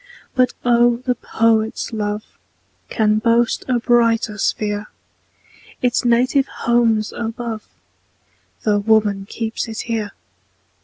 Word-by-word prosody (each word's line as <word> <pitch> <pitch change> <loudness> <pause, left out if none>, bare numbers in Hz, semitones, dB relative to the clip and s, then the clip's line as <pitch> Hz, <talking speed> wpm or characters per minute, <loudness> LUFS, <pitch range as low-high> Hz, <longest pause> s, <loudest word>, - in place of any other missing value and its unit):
But 255 -1 +2
oh! 240 0 +4
the 250 +1 -1
poet's 225 -1 0
love 210 -1 -2 0.7
Can 215 -2 +2
boast 235 +2 +2
a 255 -2 +2
brighter 230 -2 +2
sphere; 210 -1 -1 1.0
Its 245 0 +2
native 255 +3 +2
home's 230 -3 +1
above, 230 -1 -5 1.0
Tho' 210 -1 +2
woman 205 -2 +2
keeps 225 +1 -3
it 225 -1 -5
here. 220 -3 -3
230 Hz, 105 wpm, -19 LUFS, 215-240 Hz, 1.0 s, oh